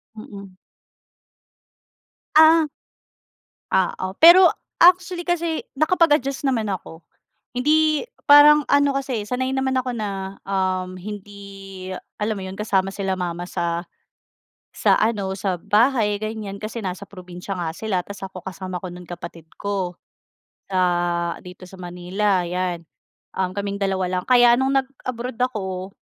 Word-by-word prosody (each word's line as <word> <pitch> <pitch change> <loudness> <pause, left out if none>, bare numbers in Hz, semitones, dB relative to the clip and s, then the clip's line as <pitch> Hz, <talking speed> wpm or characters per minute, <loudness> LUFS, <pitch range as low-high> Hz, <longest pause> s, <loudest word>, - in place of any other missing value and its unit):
Mm. 200 -2 -10 1.8
Ah. 315 0 +7 1.0
Oo. 190 0 -1
Pero, 350 +3 +9 0.3
actually 355 0 +5
kasi 340 -2 -1
nakapag-adjust 295 -4 +2
naman 245 -6 0
ako. 180 -4 -6 0.6
Hindi, 310 +3 +2 0.2
parang 295 +1 +8
ano 285 -1 +3
kasi 260 -6 -2
sanay 260 +3 -2
naman 265 0 0
ako 255 0 0
na, 195 -3 -5
um, 185 -1 -1
hindi, 195 -1 -9 0.3
alam 215 0 -1
mo - - -6
'yon 190 - -7
kasama 195 -3 0
sila 190 -2 -2
mama 175 -1 -3
sa 170 -1 -2 0.9
sa - - +3
ano, 200 -4 0
sa 185 -3 -2
bahay, 215 -1 +2
ganiyan. 215 -2 -5
Kasi 215 +3 -6
nasa 190 -1 -5
probinsya 180 0 -9
nga 165 -2 -2
sila 210 -5 -1
'tas 200 +2 -8
ako 190 -1 -8
kasama 185 -1 -6
ko 185 - -7
no'n 180 0 -10
kapatid 170 -2 -9
ko, 195 -3 -2 0.8
sa 175 -2 0
dito 180 0 -12
sa 185 - -13
Manila, 180 +2 -1
'yan. 180 -1 -3 0.5
Um, 185 -1 -1
kaming 200 0 -3
2 190 -1 0
lang. - - -8
Kaya 245 -1 +7
no'ng 270 +1 +2
nag-abroad 255 -2 -6
ako, 190 -7 -2
200 Hz, 130 wpm, -22 LUFS, 185-255 Hz, 1.8 s, Pero